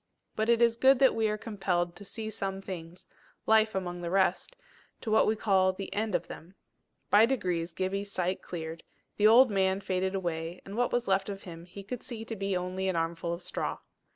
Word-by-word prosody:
But 220 +1 0
it 235 0 +5
is 230 -1 +3
good 265 +2 +6
that 265 0 +5
we 220 -1 +1
are 210 - -1
compelled 180 -6 -2
to 205 - -10
see 220 +2 -6
some 195 -2 -3
things, 180 -2 -8 0.4
life 220 -1 +4
amongst 175 -2 -3
the 170 - -3
rest, 195 - +1 0.5
to 220 - -3
what 220 - +4
we 215 - +2
call 190 -3 +3
the 195 +1 -6
end 215 -2 -1
of - - 0
them. 175 +4 -11 0.6
By 215 +2 +7
degrees 175 -9 -1
Gibbie's 195 +2 -2
sight 185 0 -1
cleared; 165 -1 -6 0.3
the 210 - +5
old 240 +2 +7
man 190 -1 +2
faded 190 0 -1
away; 170 -2 -3
and 195 - -8
what 245 +1 +1
was 245 0 0
left 195 +1 +1
of 200 -1 -6
him 170 -2 -9
he 190 +3 -10
could 235 +4 -6
see 225 -2 -7
to 225 - -5
be 195 -2 -1
only 185 +1 -3
an 190 - 0
armful 165 +1 -2
of 170 +1 -5
straw. - - -3
195 Hz, 210 wpm, -29 LUFS, 180-220 Hz, 0.6 s, By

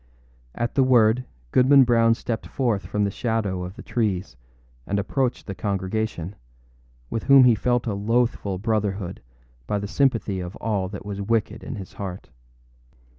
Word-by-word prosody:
At 120 0 -2
the 135 - +3
word, 125 -1 +4 0.3
Goodman 135 +2 +6
Brown 115 -2 +4
stepped 115 -1 -4
forth 110 -9 -1
from 105 +2 0
the 100 - 0
shadow 105 -5 -1
of 90 +2 -7
the 120 - -10
trees 100 - -1 0.5
and 100 - 0
approached 125 +5 -1
the 100 - -5
congregation, 95 -2 -2 0.8
with 115 - -3
whom 135 -1 +8
he 125 -2 +6
felt 120 +3 0
a 110 - -1
loathful 105 -1 0
brotherhood 100 -3 -2 0.5
by 105 - 0
the 100 0 -3
sympathy 115 -6 +1
of 90 +2 -6
all 100 -4 -2
that 100 +1 -8
was 100 -1 -4
wicked 110 +1 -1
in - - -5
his 95 -4 -9
heart. 95 -2 -7
110 Hz, 160 wpm, -24 LUFS, 100-120 Hz, 0.8 s, whom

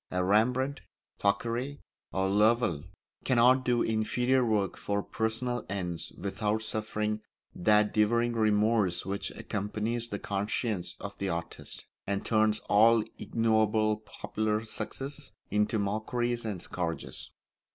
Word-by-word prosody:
A 90 0 0
Rembrandt, 125 +8 +2 0.4
Thackeray, 120 +7 0 0.3
or 95 +1 0
Lowell 105 -5 +2 0.4
cannot 130 +1 +5
do 120 -2 +2
inferior 120 +4 +1
work 105 -5 +1
for 100 0 -2
personal 115 +2 -2
ends 90 -4 -3
without 105 +3 -1
suffering 105 0 -2 0.3
that 105 +2 +3
devouring 115 +3 +2
remorse 105 -4 +2
which 100 +1 -2
accompanies 110 +4 -2
the 100 - -4
conscience 105 -1 -2
of 100 0 -6
the 100 - -1
artist, 85 -1 -6 0.2
and 100 0 -1
turns 110 -1 +2
all 110 +2 +5 0.2
ignoble 110 -1 +2
popular 110 0 -3
successes 135 +5 -5 0.2
into 105 +2 +2
mockeries 115 +4 -1
and 100 -5 -3
scourges. 85 -2 -4
110 Hz, 115 wpm, -30 LUFS, 100-115 Hz, 0.4 s, cannot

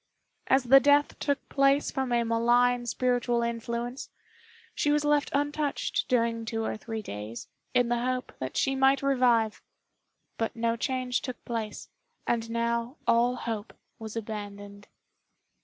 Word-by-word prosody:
As 265 0 +4
the 265 +2 +7
death 285 +1 +3
took 285 -1 -1
place 275 +1 +2
from 265 -2 -2
a 235 -1 +2
malign 240 +1 +2
spiritual 245 -1 +1
influence, 235 +2 -4 0.6
she 295 - 0
was 295 0 +2
left 295 -1 +2
untouched 290 +1 -1
during 230 -2 +1
two 225 0 -3
or - - -2
three 220 0 -6
days, 105 - -7 0.3
in 245 -1 +3
the 240 0 +1
hope 255 0 -2
that 130 0 -4
she 270 - +2
might 270 +1 +3
revive; 245 -5 +2 0.8
but 225 - -1
no 230 0 0
change 255 +1 -1
took 255 -3 -7
place, 225 -3 -4 0.4
and 230 -1 -1
now 235 +3 -1
all 240 +2 +3
hope 225 -3 -5 0.3
was 220 -1 -7
abandoned. 205 -2 -7
240 Hz, 140 wpm, -28 LUFS, 230-265 Hz, 0.8 s, the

